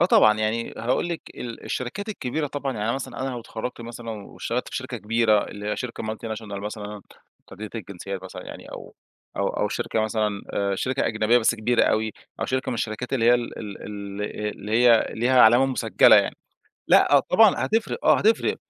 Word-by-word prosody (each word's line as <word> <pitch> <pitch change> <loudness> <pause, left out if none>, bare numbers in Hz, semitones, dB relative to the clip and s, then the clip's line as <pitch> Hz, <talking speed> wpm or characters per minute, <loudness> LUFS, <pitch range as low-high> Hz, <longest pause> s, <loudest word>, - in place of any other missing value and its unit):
آه 175 - +5
طبعًا، 110 -10 +5
يعني 110 +2 -1
هاقول 130 +9 0
لِك 170 - -3
ال 120 -2 -7
الشركات 195 - -4
الكبيرة 150 -5 -2
طبعًا، 140 -1 -3
يعني 105 -2 -4
أنا 115 - +1
مثلًا 130 -3 -6
أنا 135 - -1
لو 120 -1 -5
اتخرجت 120 +2 -6
مثلًا 115 0 -7
واشتغلت 110 +3 -4
في - - -5
شركة 130 -1 -4
كبيرة، 110 -1 +2
اللي 105 0 -8
هي - - -1
شركة 120 -2 -5
multinational 110 -2 -5
مثلًا، 105 -1 -6 0.5
متعددة 105 +2 -9
الجنسيات 100 -2 -6
مثلًا 95 - -8
يعني، - - -10
أو - - -10 0.4
أو - - +1
أو - - -1
شركة 110 - -2
مثلًا، 105 -2 -1
آآ، 100 -1 0
شركة 130 +6 -1
أجنبية 115 +2 +3
بس 120 +1 +2
كبيرة 115 +2 +1
أوي، 110 -1 +1 0.3
أو - - 0
شركة 130 0 -1
من - - -2
الشركات 115 +3 -4
اللي 120 -4 +1
هي 120 - +7
ال 120 -1 -3
ال 105 -3 -7
ال 100 -1 -6 0.4
اللي 105 +2 -6
هي 120 -1 +5
ليها 125 +3 +3
علامة 120 +4 +6
مسجّلة 115 -6 +5
يعني. - - +2 0.5
لأ 145 - +6
طبعًا 210 +1 +6
هتفرق 225 +1 -1
آه - - +6
هتفرق. 220 +2 +2
115 Hz, 195 wpm, -24 LUFS, 105-125 Hz, 0.5 s, هي